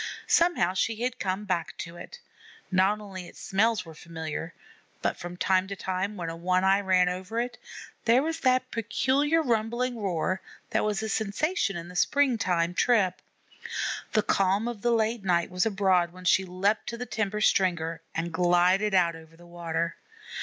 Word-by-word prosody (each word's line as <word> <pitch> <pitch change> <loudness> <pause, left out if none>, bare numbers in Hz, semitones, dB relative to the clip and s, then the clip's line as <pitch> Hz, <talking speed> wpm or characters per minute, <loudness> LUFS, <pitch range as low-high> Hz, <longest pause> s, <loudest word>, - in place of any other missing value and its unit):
Somehow 335 - +3
she 220 +4 0
had 250 - +1
to - - -20
come 190 +2 -2
back 180 -4 -2
to 170 0 -7
it; 485 - -10 0.5
not 190 +3 +3
only 190 -4 -8
its - - -14
smells 220 +2 +1
were 165 - -10
familiar, 160 0 -6 0.5
but - - +1
from 175 0 -8
time 185 0 +2
to 200 - -5
time, 190 +2 -3
when 170 -2 -4
a 165 - -4
One 180 +2 +1
eye 195 +1 +4
ran 185 -2 +3
over 185 +5 -3
it, 245 +1 -3 0.5
there 240 +3 +5
was 325 +1 -2
that 255 0 +2
peculiar 265 +8 +1
rumbling 235 0 0
roar 185 0 -1 0.3
that - - +1
was 210 0 -1
a 220 - -2
sensation 220 - 0
in 170 0 -7
the 180 - -11
springtime 185 -9 +2
trip. 195 -4 +2 0.9
The 215 - +3
calm 195 +2 +2
of 235 -4 -5
the 240 - +1
late 225 -1 +1
night 175 -3 +1
was 180 +4 +1
abroad 190 -4 +2
when 185 +1 -13
she 190 +2 +4
leaped 195 +4 0
to 235 - -4
the 250 - -4
timber 210 -3 -2
stringer 170 -5 +1
and 165 +1 -2
glided 180 +4 +3
out 170 -3 +3
over 165 0 -14
the 175 - -16
water. 170 -1 -3
190 Hz, 180 wpm, -27 LUFS, 175-225 Hz, 0.9 s, there